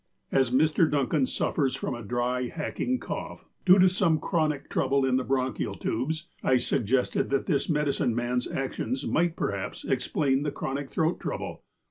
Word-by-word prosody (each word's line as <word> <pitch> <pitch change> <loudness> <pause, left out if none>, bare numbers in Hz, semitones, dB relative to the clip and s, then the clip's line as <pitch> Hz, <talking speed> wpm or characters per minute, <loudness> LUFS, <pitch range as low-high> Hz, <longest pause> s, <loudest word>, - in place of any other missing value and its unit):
As 130 -2 +3
Mr. 155 +5 +3
Duncan 140 -1 +1
suffers 135 -4 0
from - - -3
a 120 - -6
dry, 125 +3 -1
hacking 170 - -2
cough, - - -6 0.2
due 185 +1 +8
to 185 0 +7
some 180 -4 +2
chronic 155 -4 0
trouble 135 0 +1
in 130 -1 +2
the 130 - 0
bronchial 130 -3 -1
tubes, 155 +8 -2
I 130 - +3
sug 125 -2 0
gested 125 +2 +1
that 135 -1 0
this 145 -3 0
medicine 145 -6 +1
man's 120 +1 -1
actions 130 0 -3
might 170 0 +1
perhaps 100 -1 -3
explain 135 +1 +1
this 145 -1 -3
chronic 135 +1 -3
throat 160 +2 0
trouble. - - -5
135 Hz, 165 wpm, -27 LUFS, 125-155 Hz, 0.2 s, due